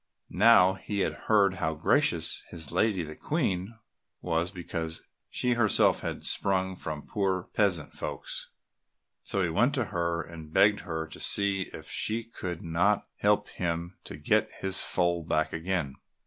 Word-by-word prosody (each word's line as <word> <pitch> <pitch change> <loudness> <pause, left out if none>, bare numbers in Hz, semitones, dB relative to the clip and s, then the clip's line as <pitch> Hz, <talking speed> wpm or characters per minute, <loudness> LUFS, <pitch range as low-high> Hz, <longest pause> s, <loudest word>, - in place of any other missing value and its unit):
Now 95 -5 +6
he 100 +1 -3
had - - 0 0.2
heard 100 -3 +4
how 80 - -1
gracious - - +2
his 80 -3 -6
lady 105 -6 +1
the 75 0 -8
Queen 95 +8 -2 0.4
was 85 0 -1
because 85 -3 -5 0.2
she 125 -1 0
herself 115 -3 +3
had - - -5
sprung 95 -1 0
from 75 -4 -6
poor 95 -3 -1
peasant 95 -8 +1
folks, - - -4 0.7
so 100 - -1
he 85 - 0
went 120 - +2
to 130 -4 0
her 85 -1 -1
and 80 -1 -11
begged 105 +5 +4
her 80 -3 -4
to 80 - -11
see 100 -2 +2
if - - -9
she 115 +2 0
could 90 -7 -6
not 90 +5 +1
help 105 0 +2
him 85 0 -3
to - - -8
get - - +2
his 95 0 +1
foal 85 -2 0
back 80 0 0
again. 80 -4 -2
90 Hz, 155 wpm, -28 LUFS, 85-100 Hz, 0.7 s, Now